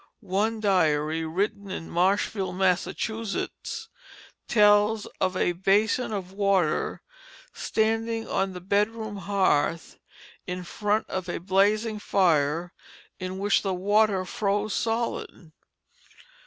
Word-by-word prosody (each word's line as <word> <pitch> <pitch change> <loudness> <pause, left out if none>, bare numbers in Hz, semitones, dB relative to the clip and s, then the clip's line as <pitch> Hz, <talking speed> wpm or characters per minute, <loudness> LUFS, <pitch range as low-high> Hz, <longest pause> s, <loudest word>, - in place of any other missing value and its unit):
One 220 +3 +1
diary, 160 -5 +1
written 200 +4 -2
in 175 -3 -5
Marshfield, 190 +1 +1
Massachusetts, 200 +3 -2 0.6
tells 210 0 +4 0.2
of 185 0 +1
a 175 - +2
basin 205 +7 +1
of 190 -3 -4
water 195 -5 +1 0.5
standing 225 +1 -1
on 195 0 -1
the 180 - -8
bedroom 210 +2 -1
hearth, 185 -5 0 0.5
in 180 0 -4
front 210 +4 -1
of 185 -1 -4
a - - -2
blazing 205 +4 +1
fire, 170 -3 +1 0.5
in 185 0 -4
which 200 +1 +2
the 190 -2 -1
water 200 0 +2
froze 205 +2 -1
solid. 225 -7 -3
195 Hz, 105 wpm, -26 LUFS, 180-215 Hz, 0.6 s, tells